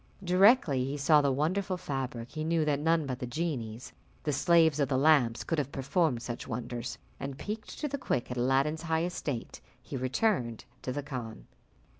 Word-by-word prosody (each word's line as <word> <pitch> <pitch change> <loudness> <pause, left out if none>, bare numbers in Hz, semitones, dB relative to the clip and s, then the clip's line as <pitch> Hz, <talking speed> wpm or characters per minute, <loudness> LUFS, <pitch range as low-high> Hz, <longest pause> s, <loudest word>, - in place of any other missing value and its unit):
Directly 180 - +5
he 135 +3 -3
saw 150 +1 +5
the 140 -1 +2
wonderful 180 +7 0
fabric, 130 -7 -4
he 155 - -4
knew 160 0 +1
that 145 -2 +1
none 160 0 +2
but 130 -2 -4
the 125 - -4
genies, 120 -6 -4 0.3
the 150 - 0
slaves 160 0 +4
of 140 -3 +2
the 130 - +2
lamp, 135 -5 +4
could 165 - 0
have 140 -1 -2
performed 135 -2 0
such 120 0 -5
wonders, 120 +1 -4 0.2
and, 135 -1 -5
piqued 215 +1 -6
to 300 - -1
the 280 0 -4
quick 125 - -1
at 125 - -4
Aladdin's 135 +5 +2
high 160 -1 0
estate, 150 -8 -4 0.2
he - - -8
returned 130 - 0 0.2
to 130 - -3
the 145 +2 -3
khan. 125 -6 -6
140 Hz, 185 wpm, -30 LUFS, 125-165 Hz, 0.3 s, Directly